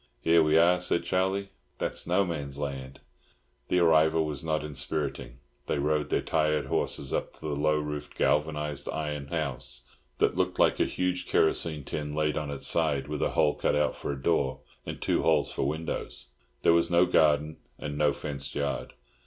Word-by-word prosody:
"Here 85 0 +4
we 75 0 +4
are!" 90 +2 +5
said 90 -1 +1
Charlie. 95 +3 0 0.3
"That's - - -2
No 90 +3 +3
Man's 70 -5 -4
Land." 70 -2 -5 0.7
The 90 - +1
arrival 80 -2 +4
was 75 -1 -4
not 80 -1 -1
inspiriting. 70 -2 -3 0.3
They - - 0
rode 75 +1 0
their - - +1
tired 75 -1 +1
horses 70 - -2
up - - -2
to - - -18
the 75 -2 -2
low 75 +1 +2
roofed 75 -1 -5
galvanised 75 -1 0
iron 75 -2 -3
house, 65 -6 -3 0.3
that - - +2
looked - - 0
like - - +3
a - - +4
huge 90 0 -2
kerosene 80 -3 +1
tin 75 +2 -4
laid 75 0 0
on 75 -2 -3
its 70 - -4
side, 75 -5 +2
with 75 -1 -3
a - - +2
hole 75 - +4
cut 75 0 +1
for - - -4
a 70 - -7
door 65 -3 0 0.3
and - - -5
two - - +1
holes 80 -3 +2
for - - -1
windows. 75 -5 -4 0.3
There 85 - +6
was 85 0 +3
no 85 +1 +5
garden 75 -3 +3 0.2
and 75 -1 -5
no 75 0 +3
fenced 70 -1 -5
yard. 70 -1 -2
75 Hz, 180 wpm, -28 LUFS, 70-80 Hz, 0.7 s, There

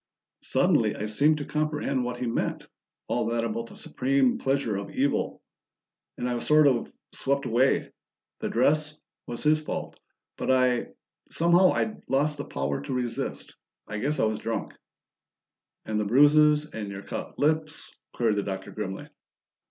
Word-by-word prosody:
"Suddenly - - +2
I 105 - -4
seemed 145 +9 +3
to 145 - -4
comprehend 150 -4 -1
what 125 0 -3
he 125 - -2
meant 115 - -2 0.4
all - - 0
that 115 0 0
about 115 +1 -3
the - - -13
supreme 135 -1 +1
pleasure 135 -5 0
of 100 0 -4
evil. 140 +2 -1 0.7
And 125 - -2
I 125 - -1
was 120 - -2
sort 155 0 +6
of 130 -4 +2 0.2
swept 140 0 0
away. 125 +3 +2 0.5
The - - -2
dress 150 +5 +2 0.3
was 120 - -5
his 155 0 +3
fault, 155 - -5 0.4
but - - -3
I 125 -2 +3 0.4
somehow 175 +2 +4
I'd 220 - -2
lost 145 +3 +1
the 145 - -5
power 70 +1 -2
to - - -6
resist. 125 -2 -3 0.3
I 105 0 -4
guess 145 +7 -1
I - - +4
was 110 -1 -1
drunk." 115 0 -3 1.1
"And 110 -1 -1
the 105 - 0
bruises? 150 +5 +5
And 105 -2 -5
your 100 0 -7
cut - - -6
lips?" 155 +1 -1 0.2
queried 110 -3 +1
the - - +2
Doctor 95 -1 -5
grimly. 95 -3 -5
130 Hz, 160 wpm, -27 LUFS, 110-150 Hz, 1.1 s, sort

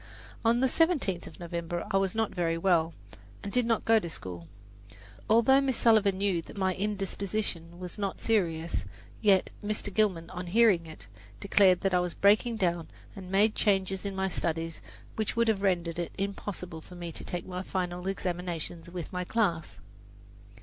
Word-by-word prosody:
On 235 +1 +3
the 265 - +4
seventeenth 285 - +1
of - - -13
November 170 0 -4
I 195 - +3
was 195 0 0
not 225 -1 0
very 170 -2 0
well, 165 -2 +2 0.5
and 200 - -4
did 250 -2 +2
not 230 -2 +1
go 225 0 +5
to 170 - -6
school. 90 - -7 0.8
Although 235 +5 +5
Miss 265 -3 0
Sullivan 210 -4 +4
knew 195 -3 +1
that 165 - -13
my 190 -1 +1
indisposition 195 -3 -3
was 180 +2 -7
not 195 -2 -2
serious, 170 -7 0 0.4
yet 195 -3 +4
Mr. 210 -1 -2
Gilman, 185 -6 +1
on 180 -1 -6
hearing 195 -4 +4
of 160 - -8
it, - - -11 0.3
declared 195 -2 +4
that 195 -1 0
I 180 - +4
was 180 -1 -2
breaking 215 +4 +4
down 175 -5 0 0.3
and 190 -3 -9
made 205 +3 +4
changes 190 -2 +1
in 200 -1 -4
my 190 0 0
studies 165 -2 -2 0.4
which 220 -1 -1
would 235 0 +2
have 215 -3 +2
rendered 175 -3 0
it 170 - -3
impossible 195 -4 -4
for 180 - -13
me 175 -1 -6
to - - -7
take 175 -1 -4
my 180 0 -4
final 180 -1 -3
examinations 175 -3 -3
with 175 -1 -7
my 180 0 -1
class. 180 -5 -1
190 Hz, 175 wpm, -29 LUFS, 175-210 Hz, 0.8 s, go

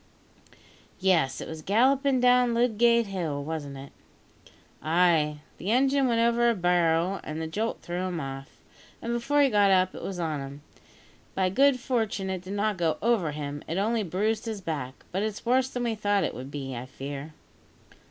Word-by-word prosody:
"Yes, 165 -9 +2
it - - -6
was 160 -1 -7
gallopin' 260 - +3
down 250 -1 +4
Ludgate 235 0 +3
Hill, 165 -8 -3
wasn't 145 -3 -5
it?" 135 +1 -10 0.9
"Ay; 155 -2 +2 0.2
the 190 - -4
engine 270 +3 +3
went 230 -2 +1
over 235 0 +3
a 235 - +1
barrow, 175 0 +2
and 155 +1 -5
the 160 - -3
jolt 210 +8 -3
threw 180 +2 -3
him 175 -3 -3
off, 135 -1 -8 0.4
and 235 - -3
before 285 +5 +2
he 275 - +4
got 205 -2 +4
up 185 -1 +3
it - - -8
was 190 -2 -5
on 160 -3 -2
him. 140 +1 -8 0.7
By 190 -1 +2
good 270 +5 +4
fortune 220 -6 -1
it 185 -2 -3
did 185 +2 -7
not 205 0 0
go 165 -3 0
over 220 -8 +1
him; 145 -1 -5
it 165 - -3
only 220 +3 +1
bruised 210 +5 -1
his 220 -2 -4
back; 145 -8 -5
but 190 - -1
it's 215 +1 -4
worse 255 +2 +2
than 245 -2 -3
we 235 -1 0
thought 205 -2 +1
it - - -2
would 130 +3 -7
be, 135 -2 -5
I 120 +2 -6
fear." 140 +3 -7
190 Hz, 185 wpm, -27 LUFS, 155-235 Hz, 0.9 s, down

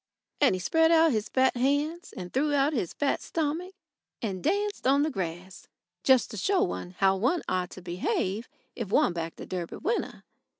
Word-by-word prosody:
And 280 -9 +4
he - - -4
spread 325 - +3
out 325 -1 +5
his 220 -2 -1
fat 260 0 +3
hands 290 +7 0
and 180 -1 -7
threw 290 +2 +1
out 280 +2 +2
his 205 - -1
fat 285 -1 0
stomach, 330 +4 -3 0.4
and 195 -5 -4
danced 405 0 0
on 280 +2 +4
the 310 - 0
grass, 180 - -6 0.4
just 260 -3 +4
to 215 - -6
show 385 - +2
one 180 - -4
how 195 -1 +4
one 255 - +1
ought 180 -1 -1
to 185 - -11
behave 185 +4 -2 0.3
if 230 -6 -4
one 190 - +3
backed 165 -1 -5
a - - -6
Derby 175 -2 -5
winner. 455 +4 -2
260 Hz, 185 wpm, -28 LUFS, 185-315 Hz, 0.4 s, out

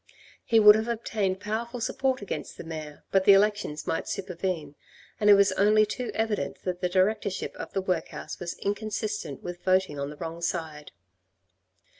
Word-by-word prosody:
He 225 -2 +4
would 210 -1 +10
have 220 +2 -1
obtained 215 -5 -1
powerful 235 +4 -3
support 260 0 -1
against 200 - -5
the - - -7
mayor 155 -2 -8
but 195 -1 +3
the 200 - +9
elections 200 -6 +1
might 165 - -2
supervene, 180 -5 -3 0.5
and 210 - +3
it 205 - +10
was 200 0 +4
only 215 +1 +4
too 245 +4 -4
evident 220 -1 -2
that 180 -1 -3
the 180 - +1
directorship 195 +2 0
of - - -7
the 195 - -1
workhouse 180 -4 -3
was 175 -1 -5
inconsistent 210 - -3
with 175 0 -7
voting 185 -6 +2
on 140 0 -3
the 150 - -10
wrong 165 +1 -6
side. 160 -4 -3
195 Hz, 170 wpm, -27 LUFS, 170-215 Hz, 0.5 s, would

